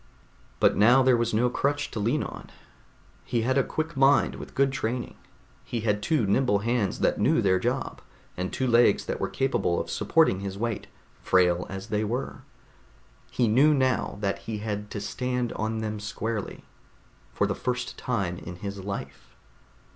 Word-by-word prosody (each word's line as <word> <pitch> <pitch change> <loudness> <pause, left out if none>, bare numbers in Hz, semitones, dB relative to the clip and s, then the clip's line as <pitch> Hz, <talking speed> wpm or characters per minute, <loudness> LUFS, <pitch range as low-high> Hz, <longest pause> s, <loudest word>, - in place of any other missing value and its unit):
But - - +4
now 120 +6 +6
there 130 -1 +5
was 120 0 0
no 115 +3 +2
crutch 145 +3 -1
to 115 - -4
lean 110 +3 +1
on. - - -8 0.7
He 115 -2 -1
had 130 +2 +1
a 135 - +4
quick 160 +4 -3
mind 135 +1 +4
with - - -10
good 135 0 +3
training. 125 -2 -3 0.5
He 115 - -4
had 105 -1 0
two 150 -2 +1
nimble 105 +1 +2
hands 115 -5 0
that - - +2
knew - - +3
their 95 -2 +3
job, - - -2 0.3
and 90 +1 -3
two 130 - -1
legs 120 -1 +4
that - - -3
were - - -1
capable 135 -10 0
of 85 - -4
supporting 160 - +2
his 100 0 -5
weight, 115 0 -3 0.3
frail 90 -1 +2
as 95 0 -7
they 105 0 0
were. 120 +5 -3 0.9
He 120 - +1
knew 140 +8 +5
now 130 -5 0
that 100 -1 -1
he 110 -1 -5
had 105 -1 -4
to 105 - -5
stand 125 +3 -2
on 110 +1 -2
them 110 -1 -3
squarely, 110 0 -4 0.7
for - - +1
the - - -1
first 125 0 -3
time 100 -8 -2
in 90 - -8
his 100 +2 -6
life. 95 -9 -7
115 Hz, 175 wpm, -26 LUFS, 100-125 Hz, 0.9 s, now